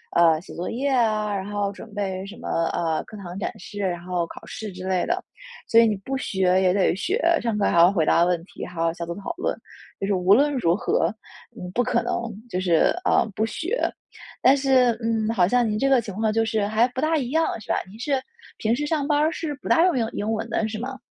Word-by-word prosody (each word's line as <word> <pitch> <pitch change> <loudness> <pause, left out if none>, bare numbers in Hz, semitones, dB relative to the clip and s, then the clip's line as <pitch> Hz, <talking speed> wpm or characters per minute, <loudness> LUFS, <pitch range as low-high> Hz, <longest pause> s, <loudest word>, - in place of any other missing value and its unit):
呃， 165 -2 +5
写 - - -12
作 175 - -4
业 275 +4 -1
啊， 215 -5 +1
然 195 +1 -3
后 205 -1 -1
准 210 +1 -12
备 190 -2 -3
什 200 +2 -9
么， - - -8 0.3
呃， 160 -2 0
课 215 - -12
堂 185 0 -7
展 - - -2
示， 205 - -9
然 175 -3 -2
后 175 -2 -2
考 - - -11
试 220 - -6
之 185 0 -8
类 185 -1 +1
的。 365 +2 -1 0.4
所 230 - +6
以 230 - +6
你， 210 - +1
不 265 +8 -4
学 190 -5 +1
也 185 -1 +3
得 190 -3 +2
学。 390 - -1 0.2
上 230 -3 -1
课 205 - +1
还 - - +1
要 170 +2 +8
回 165 -6 +1
答 170 - +4
问 175 -2 0
题， - - -8
还 175 -2 -6
要 165 - +2
小 170 0 -6
组 170 - -5
讨 205 +10 -5
论。 375 - -2 0.4
就 195 - 0
是 205 - +1
无 185 +2 +4
论 290 +4 +3
如 170 -8 +2
何， 240 - +1 0.5
你 180 -6 -7
不 245 - +2
可 240 -1 +1
能 240 - -2 0.4
就 185 - -2
是， 175 -3 +3
呃， - - +4
不 220 - 0
学。 360 - -3 0.6
但 265 +2 +6
是， 265 -3 +4
嗯， 225 -1 0
好 180 -5 +3
像 245 +2 +2
您 210 0 -1
这 275 - +2
个 265 -3 +5
情 210 -3 -7
况 215 0 0
就 225 0 +2
是 220 -2 0
还 220 +2 +3
不 255 - -6
大 320 +1 +2
一 250 -4 -2
样， 320 +4 +2 0.2
是 - - -15
吧？ - - +2
您 210 - -12
是 270 +1 0 0.4
平 225 +1 +1
时 295 +4 -2
上 295 -2 -1
班 295 -1 +2
儿 310 +2 +2
是 310 -3 -4
不 - - -9
大 330 - +5
用 360 -6 +2
英 230 -2 +1
英 210 +2 -2
文 215 - -3
的 220 - 0
是 215 0 -5
吗？ 260 +3 -6
215 Hz, 275 characters per minute, -24 LUFS, 185-255 Hz, 0.6 s, 要